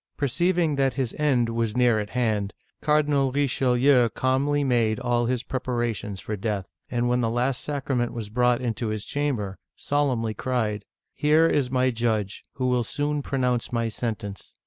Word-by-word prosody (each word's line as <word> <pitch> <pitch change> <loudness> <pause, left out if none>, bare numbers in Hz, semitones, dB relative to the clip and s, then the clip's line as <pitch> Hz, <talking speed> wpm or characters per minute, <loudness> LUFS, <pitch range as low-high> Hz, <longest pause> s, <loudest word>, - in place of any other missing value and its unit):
Perceiving 165 +2 +1
that 135 -1 +1
his 130 -4 -1
end 130 -6 +2
was 115 -1 -1
near 120 -3 +4
at 105 -1 -4
hand. 110 -5 0 0.3
Cardinal 150 -3 +2
Richelieu 130 -2 +3
calmly 140 +4 +1
made 115 -4 +2
all 120 -1 +1
his 125 0 -1
preparations 120 -6 -3
for 105 - -4
death, 100 -1 -2 0.2
and 120 -1 0
when 125 0 +2
the 115 - +1
last 125 +2 0
sacrament 135 -4 -1
was 115 -4 -6
brought 125 +2 +2
into 115 -1 -2
his 110 -1 -3
cham 145 -1 -1
ber, 100 -3 -5 0.2
solemnly 130 -6 0
cried: 110 -3 -2 0.2
" - - -65
Here 155 +2 +4
is 140 -6 +1
my 130 0 +2
judge, 110 -4 -1
who 130 - -3
will 125 -1 +2
soon 145 +5 -1
pronounce 125 -3 -1
my 115 -1 0
sentence. 105 -4 -5
125 Hz, 170 wpm, -25 LUFS, 115-135 Hz, 0.3 s, near